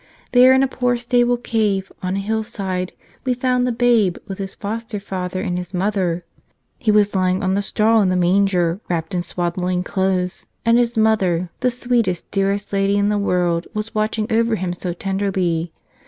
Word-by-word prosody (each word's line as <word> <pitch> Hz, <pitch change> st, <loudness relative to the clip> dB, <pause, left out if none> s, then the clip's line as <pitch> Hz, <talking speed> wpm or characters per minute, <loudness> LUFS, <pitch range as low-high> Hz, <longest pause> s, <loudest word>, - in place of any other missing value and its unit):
There 250 Hz, +1 st, +7 dB
in 265 Hz, 0 st, +5 dB
a -, -, +3 dB
poor 250 Hz, -1 st, 0 dB
stable 245 Hz, 0 st, +2 dB
cave 210 Hz, -5 st, -1 dB
on 185 Hz, +1 st, -2 dB
a -, -, -1 dB
hillside 195 Hz, -3 st, -3 dB, 0.3 s
we 255 Hz, -2 st, 0 dB
found 250 Hz, 0 st, +1 dB
the -, -, +1 dB
Babe 230 Hz, -6 st, +2 dB
with 195 Hz, -1 st, -6 dB
His 195 Hz, 0 st, -5 dB
foster 220 Hz, +1 st, -4 dB
father 185 Hz, -2 st, -4 dB
and 180 Hz, -1 st, -2 dB
His 180 Hz, +1 st, -7 dB
Mother. 180 Hz, -3 st, 0 dB, 0.5 s
He 245 Hz, -6 st, -1 dB
was 210 Hz, -1 st, +4 dB
lying 185 Hz, +1 st, +1 dB
on 190 Hz, 0 st, +1 dB
the 200 Hz, -, +1 dB
straw 220 Hz, +2 st, +2 dB
in 190 Hz, -, +2 dB
the 185 Hz, -, +1 dB
man¬ 180 Hz, +3 st, +3 dB
ger, 175 Hz, -2 st, 0 dB
wrapped 165 Hz, -1 st, -2 dB
in 180 Hz, -, 0 dB
swaddling 180 Hz, +1 st, -2 dB
clothes; 185 Hz, -1 st, -1 dB, 0.2 s
and 230 Hz, +1 st, +5 dB
His 235 Hz, -1 st, 0 dB
Mother, 185 Hz, -6 st, +2 dB
the 250 Hz, -, +2 dB
sweetest, 240 Hz, -7 st, -1 dB
dearest 200 Hz, +1 st, -1 dB
Lady 195 Hz, 0 st, +2 dB
in 205 Hz, 0 st, +2 dB
the 210 Hz, -1 st, +1 dB
world, 175 Hz, -3 st, 0 dB
was 215 Hz, +2 st, -4 dB
watching 215 Hz, 0 st, 0 dB
over 230 Hz, 0 st, +2 dB
Him 185 Hz, -3 st, -2 dB
so 180 Hz, 0 st, -4 dB
tenderly. 185 Hz, -3 st, -1 dB
195 Hz, 185 wpm, -20 LUFS, 180-225 Hz, 0.5 s, There